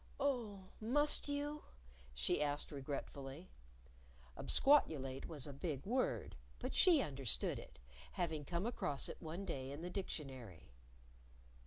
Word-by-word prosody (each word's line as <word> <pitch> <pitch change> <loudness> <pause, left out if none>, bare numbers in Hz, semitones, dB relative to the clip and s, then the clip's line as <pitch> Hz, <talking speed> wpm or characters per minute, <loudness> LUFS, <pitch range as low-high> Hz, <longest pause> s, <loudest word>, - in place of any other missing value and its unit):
"Oh, 240 -8 0 0.2
must 290 +9 +3
you?" 290 +1 -1 0.5
she 65 - +2
asked 145 0 0
regretfully. 140 +2 -5 0.8
Absquatulate 140 - +3
was 150 -5 -2
a 145 - -5
big 140 -1 -3
word, 250 +5 +1 0.2
but - - -3
she 335 -8 +6
understood 135 -5 0
it, 70 - -12 0.4
having 165 -5 -1
come 170 +5 -1
across 145 - -1
it - - -7
one 170 +4 -4
day 135 -7 -3
in 145 +4 -6
the 180 - -3
Dictionary. 130 - -5
160 Hz, 125 wpm, -39 LUFS, 135-230 Hz, 0.8 s, she